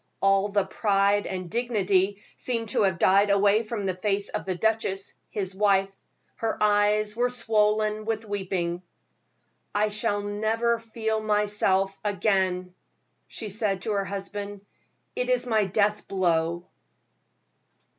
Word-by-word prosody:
All 195 +1 +3
the 200 -1 +1
pride 200 -1 +1
and 185 -1 -4
the - - -11
dignity 205 -3 +1
seemed 230 -3 -2
to - - +1
have 190 -3 +2
died 200 +4 +4
away 200 +2 +4
from 215 -2 -4
the 190 - 0
face 200 +2 -1
of - - -4
the 185 -1 -2
duchess, 200 -1 -1 0.2
his 190 -2 -3
wife; 195 -1 +2 0.4
her 225 -1 -2
eyes 210 0 +2
were 245 +1 +1
swollen 215 -2 +1
with 225 0 -2
weeping. 185 -4 -2 0.9
"I 210 +1 +2
shall 205 -1 -1
never 220 +3 0
feel 220 -1 -2
myself 205 -2 +1
again," 190 -3 0 0.5
she 220 - -5
said 200 -2 0
to 220 - -1
her 200 -1 0
husband; 200 +1 -6 0.5
"it - - -1
is - - +2
my 220 -4 +2
death 210 +2 0
blow." 170 -2 0
205 Hz, 135 wpm, -26 LUFS, 195-215 Hz, 0.9 s, died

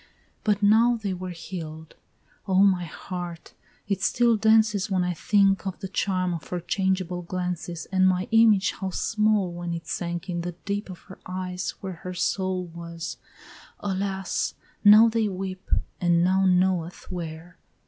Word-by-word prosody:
But 210 -1 +1
now 225 +4 +5
they 210 -4 -3
were 185 0 -5
heal'd, 160 -3 -7 0.5
O 190 0 +4
my 185 -3 +3
heart, 175 0 -7 0.3
it 195 -2 -1
still 235 +4 +3
dances 215 -1 +3
When 185 -2 +1
I 180 0 0
think 195 +2 +2
of 190 - -4
the 195 - -5
charm 185 -2 0
of 165 - -6
her 180 - -3
changeable 185 0 -1
glances, 175 -1 -4
And 185 -1 +4
my 185 0 +1
image 225 -3 +5
how 190 - -4
small 210 -1 +1
when 175 0 -4
it 165 -1 -7
sank 170 +2 -4
in 175 -2 -2
the 175 +1 -4
deep 200 0 -3
Of 180 - -9
her 190 - -13
eyes 185 0 -4
where 190 -3 -6
her 180 0 -6
soul 185 +1 -1
was, 170 0 -7 0.6
Alas! 195 -1 -2 0.3
now 215 +2 +9
they 225 -1 +1
weep, 190 0 -5 0.3
And 175 -1 +3
none 185 0 +4
knoweth 180 -2 -1
where. 170 0 -7
185 Hz, 160 wpm, -25 LUFS, 175-200 Hz, 0.6 s, now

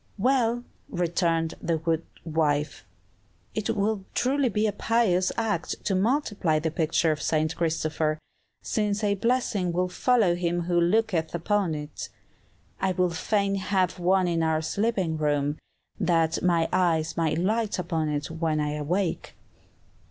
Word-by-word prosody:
"Well," 240 +1 +2 0.3
returned 170 -2 0
the 165 -1 0
good 160 0 -1 0.2
wife, 155 -2 -1 0.7
"it 215 - -2
would 205 -1 0
truly 270 0 +2
be 210 0 0
a 215 - +2
pious 205 -4 +1
act 215 -7 -1
to 195 - +1
multiply 205 - +1
the 160 +1 -1
picture 160 0 +1
of 155 - -3
'St. 155 0 0
Christopher,' 155 -2 0 0.5
since 210 -1 -1
a 205 -1 +3
blessing 205 -4 0
will 180 +1 0
follow 220 -1 +3
him 175 0 -1
who 175 0 +1
looketh 175 -3 +1
upon 180 -1 0
it. 150 0 -6 0.7
I 190 -1 +1
would 180 -1 0
fain 200 +3 0
have 190 -2 0
one 185 +1 +3
in 170 -1 0
our 160 -1 +1
sleeping 190 -3 0
room, 145 -1 0 0.4
that 165 -2 +2
my 170 -2 +2
eyes 165 -3 +1
may 165 -2 +1
light 210 +6 0
upon 165 -3 -1
it 145 +1 -3
when 160 -1 -1
I 150 0 -1
awake." 175 +5 -2
175 Hz, 145 wpm, -26 LUFS, 160-205 Hz, 0.7 s, a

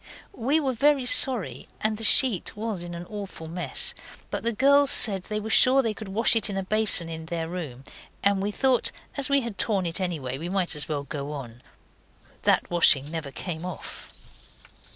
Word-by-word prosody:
We 280 - 0
were 270 -4 -1
very 275 +2 +2
sorry, 250 -4 +1
and 215 0 0
the 225 - -6
sheet 220 -4 +3
was 215 -4 -4
in 175 0 -7
an 170 +1 -7
awful 200 -5 -8
mess; 175 +2 0 0.4
but - - -3
the 235 - +1
girls 280 +4 +4
said 195 -8 +4
they 210 0 -3
were 220 +1 -5
sure 265 +3 +5
they 225 -2 -1
could 215 -1 -9
wash 215 +4 +3
it 220 -2 +2
in 200 - -4
the 195 - -2
basin 210 -4 +1
in 160 -1 -7
their 165 -1 -3
room, 155 -8 -7 0.4
and 200 -1 +3
we 200 - -1
thought 255 +3 +1 0.2
as 280 -2 -1
we 280 0 +3
had 235 -5 -7
torn 200 -5 +1
it 170 +3 -2
anyway, 140 -8 -3
we 170 +3 -5
might 185 -4 -1
as 150 - -3
well 145 -2 -2
go 140 +1 -6
on. 125 -4 -9 0.8
That - - +1
washing 150 -4 +3
never 160 -4 -5
came 160 +3 -6
off. 180 -1 -8
195 Hz, 195 wpm, -25 LUFS, 165-230 Hz, 0.8 s, sure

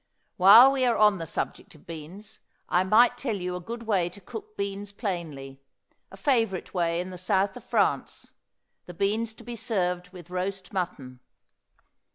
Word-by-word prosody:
While 220 +8 +9
we 270 -1 0
are 235 - +2
on 210 -3 +4
the 165 - -5
subject - - -5
of 155 - -19
beans 175 +7 -9 0.3
I 180 - +2
might 220 +6 +4
tell 235 -6 -2
you 180 -2 -4
a - - -4
good 230 +6 -7
way 195 -6 +1
to 180 - -14
cook 425 - -10
beans 200 0 -4
plainly, 155 - -5 0.5
a - - -13
favorite 225 -9 0
way 170 -2 0
in 180 +1 -4
the 180 - -8
south 190 +2 +1
of - - -10
France, - - -1 0.6
the 175 - -9
beans 220 +4 -1
to - - -13
be 240 0 -7
served 180 -6 -2
with 180 -2 -13
roast 185 +1 -4
mutton. 145 -9 -4
190 Hz, 175 wpm, -27 LUFS, 180-220 Hz, 0.6 s, While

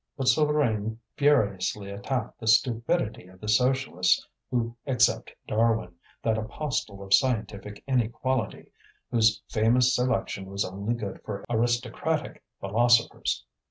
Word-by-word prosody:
But 135 -2 -2
Souvarine 120 -6 +2 0.2
furiously 100 -8 +1
attacked 125 +6 -3
the 110 - -7
stupidity 115 - +2
of 95 0 -17
the 105 - -8
Socialists 125 -5 +2 0.2
who 115 -1 -1
accept 125 -2 +2 0.2
Darwin, 110 -4 +1 0.3
that 110 -1 +1
apostle 110 -3 -3
of 95 0 -1
scientific 105 -5 +1
inequality, 125 -2 -1 0.4
whose 110 -2 +3
famous 120 +4 +3
selection 125 -5 -1
was 100 +1 -2
only 100 +5 -3
good 105 -5 -6
for 105 -2 -6
aristocratic 120 +6 -1 0.2
philosophers. 115 +4 +2
115 Hz, 115 wpm, -27 LUFS, 105-125 Hz, 0.4 s, whose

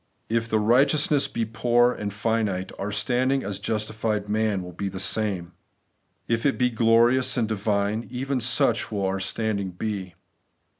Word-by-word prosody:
If 115 +1 0
the 110 - +2
righteousness 140 +6 +3
be 115 - -2
poor 120 +3 +2
and 105 -4 -4
finite, 105 -3 -1
our 100 +2 -3
standing 125 +6 +1
as 100 -1 -4
justified 110 0 -2
men 105 -2 0
will 90 - -8
be 95 +3 -4
the 95 0 -7
same. 95 -3 -1 0.8
If 115 0 0
it 140 - +1
be 125 -1 +2
glorious 115 +3 +3
and 115 -3 +1
divine, 105 +1 -1
even 130 +2 -2
such 115 -1 +2
will 100 -2 -1
our 95 0 -1
standing 100 0 -2
be. 95 -1 -5
110 Hz, 155 wpm, -25 LUFS, 100-120 Hz, 0.8 s, righteousness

